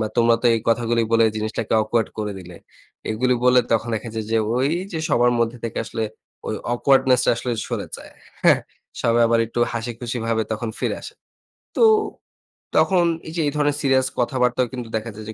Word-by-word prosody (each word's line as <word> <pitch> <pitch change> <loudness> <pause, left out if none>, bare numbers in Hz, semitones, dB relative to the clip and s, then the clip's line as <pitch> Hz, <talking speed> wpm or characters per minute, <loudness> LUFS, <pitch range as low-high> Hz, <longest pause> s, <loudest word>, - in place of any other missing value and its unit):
বা 110 - 0
তোমরা 115 0 +4
তো - - +3
এই 115 - -1
কথাগুলি 115 0 +2
বলে 115 0 +5
জিনিসটাকে 110 +1 -3
awkward 110 +1 0
করে 105 -1 -2
দিলে। 90 -2 -11 0.5
এগুলি 125 +3 +1
বলে 125 0 +6
তখন 115 +1 +1
দেখা 110 +1 -4
যায় 110 -1 -3
যে, 115 - +3 0.2
ওই 130 +3 +2 0.2
যে 160 - -2
সবার 120 -3 +3
মধ্যে 115 +1 0
থেকে 115 - -3
আসলে 115 0 -4 0.4
ওই - - -2 0.2
awkwardness 130 -1 +3
টা - - +4
আসলে 125 - -3 0.2
সরে - - -4
যায়, - - -13 0.3
হ্যাঁ? - - +6 0.4
সবাই 115 0 +3
আবার 115 0 +2
একটু 120 +1 -3
হাসি-খুশি 120 +1 -4
ভাবে 110 -1 +1
তখন 110 +1 -3
ফিরে - - -1
আসে। - - -9 0.6
তো, - - +4 0.9
তখন 185 -2 +4 0.2
এই 160 - -7
যে, 165 - 0
এই - - 0
ধরনের 145 -1 +1
সিরিয়াস 130 -2 +2
কথাবার্তাও 125 0 +1
কিন্তু 125 -2 -5
দেখা 110 +1 -3
যায় 110 - -9
যে, - - -5
120 Hz, 190 wpm, -22 LUFS, 115-125 Hz, 0.9 s, বলে